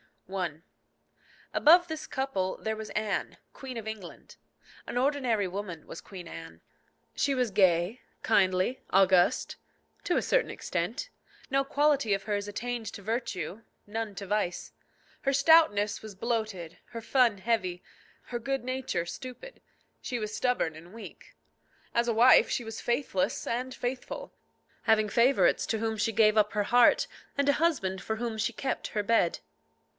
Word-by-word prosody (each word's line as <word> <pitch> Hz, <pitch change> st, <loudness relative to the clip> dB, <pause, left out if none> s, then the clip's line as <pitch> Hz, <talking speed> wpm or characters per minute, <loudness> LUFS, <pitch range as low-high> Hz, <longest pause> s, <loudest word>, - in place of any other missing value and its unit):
I. 170 Hz, -5 st, -3 dB, 0.9 s
Above 350 Hz, +3 st, +6 dB
this 315 Hz, -1 st, -5 dB
couple 265 Hz, -9 st, -2 dB
there 220 Hz, 0 st, -3 dB
was 220 Hz, 0 st, -6 dB
Anne, 215 Hz, -2 st, -2 dB, 0.2 s
Queen 265 Hz, -2 st, -8 dB
of 225 Hz, -2 st, -5 dB
England. 215 Hz, -5 st, -8 dB, 0.5 s
An -, -, -4 dB
ordinary 250 Hz, -6 st, +1 dB
woman 180 Hz, -3 st, -6 dB
was -, -, -8 dB
Queen 185 Hz, -3 st, -10 dB
Anne. 80 Hz, -, -10 dB, 0.5 s
She 280 Hz, -1 st, +1 dB
was 250 Hz, -4 st, 0 dB
gay, 185 Hz, +3 st, +3 dB, 0.2 s
kindly, 190 Hz, +3 st, +2 dB
august 185 Hz, -2 st, +3 dB, 0.5 s
to 360 Hz, -, +1 dB
a -, -, +2 dB
certain -, -, +1 dB
extent. -, -, -3 dB, 0.4 s
No 275 Hz, 0 st, +2 dB
quality 280 Hz, -6 st, +2 dB
of 195 Hz, 0 st, -1 dB
hers 205 Hz, 0 st, -2 dB
attained 235 Hz, +2 st, -4 dB
to -, -, -8 dB
virtue, 205 Hz, -4 st, -3 dB, 0.2 s
none 215 Hz, -1 st, -4 dB
to 200 Hz, -, -6 dB
vice. 200 Hz, -3 st, -2 dB, 0.5 s
Her 275 Hz, -, +2 dB
stoutness 275 Hz, -8 st, +4 dB
was 215 Hz, -2 st, -9 dB
bloated, 215 Hz, -6 st, -3 dB
her 230 Hz, -, -6 dB
fun 235 Hz, -3 st, +3 dB
heavy, 190 Hz, -5 st, -1 dB, 0.4 s
her 240 Hz, -, -3 dB
good 270 Hz, +3 st, -2 dB
nature 255 Hz, -9 st, -2 dB
stupid. 255 Hz, -, -9 dB, 0.4 s
She 250 Hz, -, -3 dB
was 215 Hz, -2 st, -4 dB
stubborn 250 Hz, -12 st, 0 dB
and 170 Hz, +4 st, -13 dB
weak. 230 Hz, -, -12 dB, 0.6 s
As 235 Hz, 0 st, +2 dB
a 235 Hz, -, +2 dB
wife 240 Hz, +3 st, +6 dB
she 245 Hz, -, -1 dB
was 225 Hz, -1 st, -7 dB
faithless 240 Hz, -6 st, -1 dB
and 250 Hz, +2 st, -3 dB
faithful, 255 Hz, -, -5 dB, 0.5 s
having 215 Hz, -2 st, +3 dB
favourites 245 Hz, +6 st, +3 dB
to 220 Hz, -, -1 dB
whom 220 Hz, 0 st, -1 dB
she 225 Hz, +1 st, 0 dB
gave 215 Hz, 0 st, +4 dB
up 210 Hz, 0 st, +3 dB
her 210 Hz, -1 st, +1 dB
heart, 240 Hz, +3 st, +5 dB, 0.3 s
and 280 Hz, 0 st, +1 dB
a -, -, +6 dB
husband 265 Hz, -, 0 dB
for 220 Hz, -, -3 dB
whom 230 Hz, -1 st, -3 dB
she 215 Hz, +2 st, 0 dB
kept 265 Hz, +4 st, -3 dB
her 210 Hz, -, -2 dB
bed. 205 Hz, -6 st, +2 dB
220 Hz, 155 wpm, -29 LUFS, 195-255 Hz, 0.9 s, Above